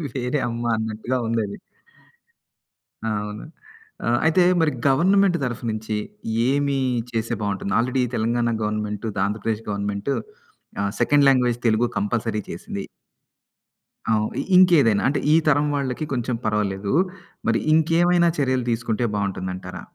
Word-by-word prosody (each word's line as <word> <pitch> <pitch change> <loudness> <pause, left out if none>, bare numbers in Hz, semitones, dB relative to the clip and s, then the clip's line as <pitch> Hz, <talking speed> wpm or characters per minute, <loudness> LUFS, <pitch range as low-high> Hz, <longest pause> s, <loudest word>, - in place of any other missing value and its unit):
వేరే 125 +2 -1
అమ్మ 115 0 -4
అన్నట్టుగా 110 +3 -2
ఉంది 115 0 0
అది. 100 - -8 1.5
అవును. 105 -1 -3 0.6
ఆహ్, 120 +1 +2
అయితే 165 +3 +4 0.2
మరి 155 -2 +3 0.2
గవర్నమెంట్ 180 +6 +4
తరఫు 120 -2 -3
నుంచి 110 0 -3 0.5
ఏమి 140 0 +1 0.3
చేస్తే 115 0 -2
బాగుంటుంది. 100 -1 -2
Already 125 +2 +1
Telangana 115 +1 +1
government, 105 +1 -3 0.2
Andhra Pradesh 110 +2 -2
government 100 +5 -2 0.7
ఆహ్, 100 - -1
సెకండ్ 145 -1 +4
లాంగ్‌వేజ్ 125 -3 +2
తెలుగు 110 +2 +3
కంపల్‌సరీ 110 +1 -1
చేసింది. 95 +3 -6 1.3
అవును. 110 0 0 0.2
ఇంకేదైనా 160 - +5
అంటే 140 +2 +1
ఈ - - +6
తరం 145 0 +4
వాళ్ళకి 140 +1 -2
కొంచెం 125 0 -1
పర్వాలేదు, 100 -1 -1 0.5
మరి 115 -1 +2
ఇంకేమైనా 170 +2 +4
చర్యలు 130 -3 +1
తీసుకుంటే 115 0 -1
బావుంటుందంటారా? 95 -2 -4
115 Hz, 115 wpm, -23 LUFS, 105-140 Hz, 1.5 s, ఈ